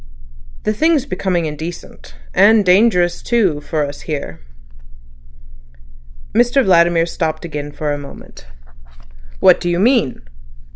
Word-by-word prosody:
The 215 - 0
thing's 310 +3 +1
becoming 180 - -2
indecent. 155 - -8 0.2
And 215 -1 +4
dangerous 180 -2 +3
too, 195 -11 0
for 155 -1 -2
us, 145 0 -8
here." 140 - -6 1.9
Mr 245 +4 +3
Vladimir 170 -2 +3
stopped 160 -1 -4
again 150 -3 -6
for 145 0 -3
a 145 - -4
moment. 140 - -13 0.9
"What - - +5
do 175 - -3
you 175 - 0
mean?" 225 - +1
175 Hz, 115 wpm, -17 LUFS, 150-215 Hz, 1.9 s, What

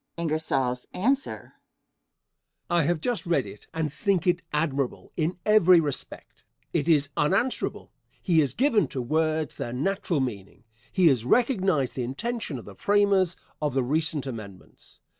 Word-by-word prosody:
Answer. 160 - -1 1.2
I 175 -1 +4
have 160 +1 0
just 240 -4 -2
read 170 - +2
it - - -12
and 160 -3 -2
think 195 -3 0
it 180 0 +2
admirable 145 -4 -2
in 165 +2 -1
every 185 -5 +6
respect. 145 -4 -5 0.3
It - - 0
is 145 -3 +4
unanswerable. 195 - 0 0.3
He 170 -4 +2
has 145 -4 +1
given 245 -5 +3
to 135 - -5
words 155 +2 0
their 120 - -4
natural 175 +4 -1
meaning. 110 -6 -5 0.3
He 185 - +2
has 125 -5 +1
recognized 190 - +1
the 125 - -1
intention 185 - -3
of 120 - -10
the 100 - -10
framers 200 - +2 0.2
of 145 -3 -1
the 135 - +2
recent 155 +2 0
amendments. 110 -7 -10
160 Hz, 140 wpm, -26 LUFS, 135-185 Hz, 1.2 s, every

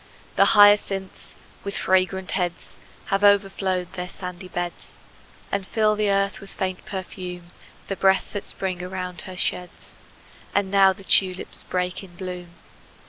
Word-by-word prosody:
The - - +5
hyacinths, 205 -2 +4 0.3
with 200 0 -4
fragrant 190 0 +1
heads, 175 -2 -3 0.3
Have 195 +1 +1
overflowed 195 -3 +2
their 180 -1 -5
sandy 180 0 -8
beds, 175 -1 -5 0.5
And 200 -1 -2
fill 215 -1 +2
the 210 -1 +1
earth 200 0 +1
with 195 - -11
faint 185 -1 -4
perfume, 180 -2 -6 0.4
The 195 - -2
breath 190 0 +2
that 205 - -3
Spring 185 -2 -4
around 180 -1 -5
her 185 - -8
sheds. 180 0 -3 0.6
And 200 -1 +1
now 195 -1 +6
the 195 +1 -9
tulips 185 -1 +1
break 180 +1 -2
in 180 -2 -14
bloom! 180 -1 -7
190 Hz, 140 wpm, -24 LUFS, 180-195 Hz, 0.6 s, now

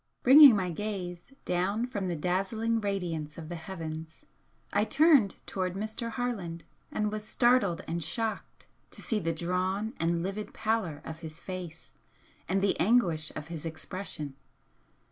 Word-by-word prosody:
Bringing 275 -1 +10
my 185 -3 0
gaze 180 - -5
down 195 +6 0
from 205 -7 -3
the 175 - -1
dazzling 195 +7 0
radiance 175 -7 -3
of 160 -1 -8
the 175 - -4
heavens, 160 -3 -7 0.5
I 205 - +3
turned 275 - +5
towards 185 -1 -2
Mr. 220 +3 -3
Harland 215 -10 -3 0.3
and 210 -1 0
was 215 0 -4
startled 225 -6 +3
and 170 +1 -2
shocked 220 +8 -3 0.2
to - - -12
see 220 - +1
the 165 -3 -1
drawn 185 +6 -1
and 170 0 +1
livid 195 +3 -4
pallor 215 -9 -1
of 160 0 -7
his 160 -1 -8
face 180 -3 -7 0.6
and 195 +1 +1
the 200 - +2
anguish 170 -6 +2
of 150 - -6
his 165 -3 -5
expression. 160 -2 -5
185 Hz, 145 wpm, -30 LUFS, 165-215 Hz, 0.6 s, Bringing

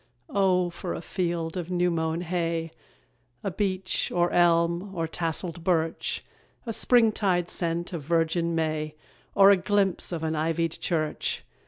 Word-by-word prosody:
O 185 -3 +2
for 175 +1 -5
a - - -4
field 170 -2 -2
of 175 -2 -4
new 180 0 +1
mown 160 0 -1
hay, 165 -2 -2 0.7
A 195 - -1
beach, 190 0 -1
or 175 0 +2
elm, 170 +2 +2
or 165 -1 -1
tasselled 165 +1 -3
birch; 165 -2 0 0.4
A 230 - -3
springtide 210 -8 +3
scent 170 +1 -2
of 170 - -3
virgin 165 +2 +1
May, 155 -1 -1 0.4
Or 195 0 +8
a 200 - +6
glimpse 195 -1 0
of 165 -2 -3
an 160 0 -1
ivied 165 +1 0
church! 155 -2 -2
170 Hz, 145 wpm, -27 LUFS, 165-185 Hz, 0.7 s, Or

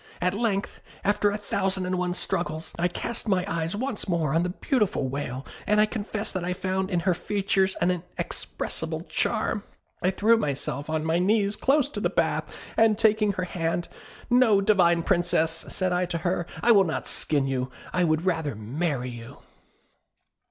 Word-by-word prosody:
At 180 +1 +1
length, 205 -2 -1 0.2
after 205 +1 +2
a 205 - -2
thousand 190 -2 -1
and 185 0 -1
one 180 0 -1
struggles, 160 -3 -2
I 175 - +3
cast 230 +6 -4
my 185 -3 +2
eyes 165 +2 -2
once 230 -3 -2
more 160 -5 +1
on 165 - +3
the 180 - 0
beautiful 210 - 0
Whale, 135 -1 -4 0.2
and 210 0 +4
I 215 - +6
confess 215 -1 -3
that 185 -2 -3
I 180 +1 -1
found 190 +1 -2
in 175 -3 0
her 185 +1 +2
features 195 +1 0
an 175 +1 +2
inexpressible 180 -1 -4
charm. - - 0 0.4
I 185 - +3
threw 215 +4 +4
myself 145 - -3
on 155 0 -1
my 165 +1 +2
knees 200 +2 +2
close 275 0 +3
to - - -5
the - - +1
bath, - - 0 0.2
and 220 -2 +4
taking 215 -2 +3
her 185 -1 -2
hand, 170 -1 -2 0.4
'No, 240 -5 +5
divine 180 -4 +4
Princess,' 165 -3 +1
said 185 -1 -1
I 180 0 +1
to 170 - -2
her; 175 0 -1 0.2
'I 235 - +6
will 200 -4 +7
not 160 - -2
skin 145 -3 +1
you, 130 -1 -1 0.2
I 180 - +2
would 155 +1 +1
rather 160 -8 0
marry 125 +4 -2
you!' 115 -1 -10
180 Hz, 180 wpm, -26 LUFS, 165-205 Hz, 0.4 s, will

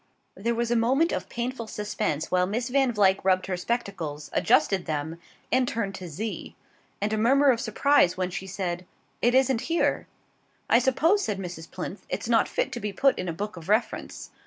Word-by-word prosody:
There 230 +5 -2
was 235 0 -1
a - - +3
moment 265 +9 +3
of - - -3
painful 240 -1 -4
suspense 210 -8 -3
while 180 0 +3
Miss 235 +5 -2
Van 270 -1 +2
Vluyck 195 -3 +3
rubbed 185 -1 +2
her 190 - -2
spectacles, 180 -8 -4
adjusted 175 +4 +2
them, 160 +2 -3 0.3
and 255 -1 +3
turned 205 -5 -2
to 185 -1 -7
Z; 210 +8 -5 0.4
and 210 +2 -1
a 215 - 0
murmur 270 +5 +5
of 235 -2 -1
surprise 280 -10 +3
when 185 -1 -1
she 190 +1 -5
said: 180 -2 -4 0.3
"It 245 +1 +3
isn't 260 -2 +3
here." 335 - +1 0.6
"I 235 - +7
suppose," 315 +11 +2
said 210 - -2
Mrs. 175 -4 -7
Plinth, - - -6
"it's - - -3
not - - +3
fit - - -1
to 240 - -4
be 210 -2 -3
put 270 +7 +2
in 180 - -3
a - - 0
book 205 +3 -5
of 170 +2 -10
reference." 215 +3 -1
210 Hz, 195 wpm, -26 LUFS, 185-245 Hz, 0.6 s, I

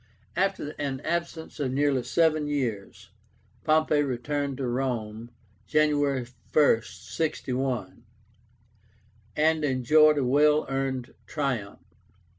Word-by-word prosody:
After 190 -5 0
an 135 -2 -2
absence 170 -1 -4
of 135 -3 -1
nearly 140 -1 +1
seven 155 +1 +1
years, 120 -9 -4 0.5
Pompey 155 -1 +3
returned 140 +1 -2
to 135 - -3
Rome, 120 -3 -3 0.4
January 145 -4 +2 0.3
1, 145 -7 +4
61, 130 -4 -3 1.3
and 155 +1 +2
enjoyed 150 +3 +4
a 135 - +1
well 150 +4 +4
earned 135 -2 -3
triumph. 130 -9 -3
140 Hz, 95 wpm, -27 LUFS, 130-150 Hz, 1.3 s, 1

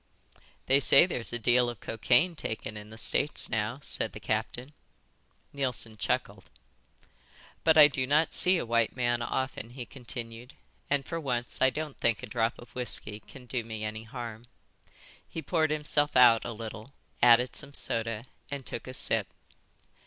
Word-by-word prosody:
"They 135 +1 +4
say 140 +3 +6
there's 125 -10 -3
a 120 - -1
deal 120 +1 +3
of 120 -4 -7
cocaine 125 +9 +2
taken 110 -6 -5
in 105 0 -9
the 110 - -11
States 145 +5 0
now," 110 +3 -1
said - - -3
the - - -8
captain. 130 +5 -3 0.8
Neilson 125 -5 -2
chuckled. 105 - -2 1.1
"But 160 -1 +5
I 150 -1 +10
do 130 -2 -1
not 150 +4 +2
see 185 0 +4
a - - -2
white 115 -1 +1
man 120 -1 0
often," 130 -1 -3
he 125 0 -8
continued, 120 -1 -9 0.3
"and 140 -1 +1
for 165 - -4
once 125 -5 -3
I 130 - +6
don't 150 +1 -5
think 115 -3 +1
a - - -2
drop 115 -1 -1
of 120 - -14
whisky 105 -3 -5
can 130 +3 -14
do 125 -1 -2
me 110 -1 -6
any 110 +1 -5
harm." 115 0 -8 0.8
He - - -6
poured 160 -3 +1
himself 150 -1 0
out 120 -3 +7
a - - -3
little, 110 +3 -8 0.3
added 120 +1 +5
some 140 -1 0
soda, 115 0 +1 0.2
and 140 -2 -5
took 115 - -4
a 130 - -6
sip. 110 -5 0
120 Hz, 165 wpm, -29 LUFS, 115-140 Hz, 1.1 s, I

